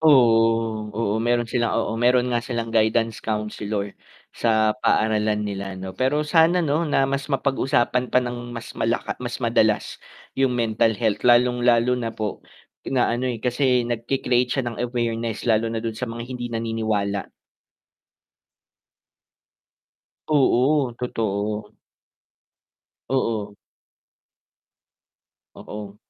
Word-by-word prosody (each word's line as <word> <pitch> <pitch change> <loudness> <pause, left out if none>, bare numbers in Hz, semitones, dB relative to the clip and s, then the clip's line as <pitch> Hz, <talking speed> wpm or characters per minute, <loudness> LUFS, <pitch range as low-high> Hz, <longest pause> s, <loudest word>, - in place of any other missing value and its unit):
Oo, 115 -6 +4
oo, 110 -1 0
meron 120 +1 +1
sila 115 0 -1
oo, - - -1
meron 125 +1 +3
nga 120 - +1
silang 115 -1 -4
guidance 115 0 +1
counselor 105 -1 -3 0.4
sa 110 -2 +2
paaralan 105 -2 +1
nila. 100 -2 -5 0.2
Pero 135 +8 0
sana 165 +2 +4 0.4
mas 140 +1 -2
mapag-usapan 130 -2 +1
pa 125 - +3
nang 120 0 -5
mas 115 - -8
malaka, 115 +1 0
mas 120 -1 -4
madalas 110 -2 +2 0.5
'yung 135 -2 +2
mental 110 -1 +1
health, 105 -2 0
lalong-lalo 120 0 +4
na 115 -2 -2
po 105 -2 -4 0.5
na 130 -3 +1
ano, 125 +2 -1
eh, 120 - -4
kasi 125 +1 +1
nag-cre-create 125 +1 0
siya 130 - +1
ng 120 -1 -4
awareness, 115 -2 -2
lalo 115 0 +2
na 115 - -2
dun 115 0 -4
sa 125 +2 -4
mga 115 +1 -6
hindi 120 -1 -4
naniniwala. 110 -3 -2 3.0
Oo, 140 -2 +3
totoo. 105 -3 -3 1.4
Oo. 110 -6 -1 2.0
Oo. 105 -1 -9
115 Hz, 110 wpm, -23 LUFS, 110-125 Hz, 3.0 s, Oo